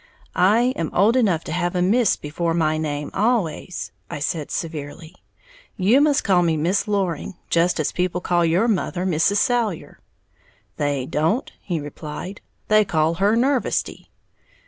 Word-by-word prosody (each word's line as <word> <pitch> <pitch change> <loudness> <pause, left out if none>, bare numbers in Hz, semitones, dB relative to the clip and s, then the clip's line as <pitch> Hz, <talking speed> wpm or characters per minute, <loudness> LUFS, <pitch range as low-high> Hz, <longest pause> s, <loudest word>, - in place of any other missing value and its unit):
"I 230 +7 +3
am 165 -2 -2
old 210 +6 +4
enough 195 -10 +2
to - - -7
have 175 +1 -1
a 180 - +1
Miss 220 +3 +3
before 165 +3 -3
my 155 -2 +1
name 145 -2 -3
always," 195 -6 -1 0.2
I - - -5
said, 150 +1 -3
severely; 160 0 -6 0.6
"you 215 +9 +4
must 290 -2 +3
call 185 -3 +3
me 165 -2 +1
Miss 175 +8 0
Loring, 195 -3 -2 0.2
just 170 +1 +2
as 155 - 0
people 180 0 -1
call 175 -1 +1
your 170 +7 +2
mother 185 -4 -1
Mrs. 185 +3 +2
Salyer." 225 -7 -1 0.8
"They 145 -3 -1
don't," 160 - 0
he 175 -4 -3
replied, 150 +6 -7 0.3
"they 215 0 +5
call 160 -4 +1
her 205 +3 +4
Nervesty." 260 +2 0
180 Hz, 150 wpm, -22 LUFS, 160-205 Hz, 0.8 s, they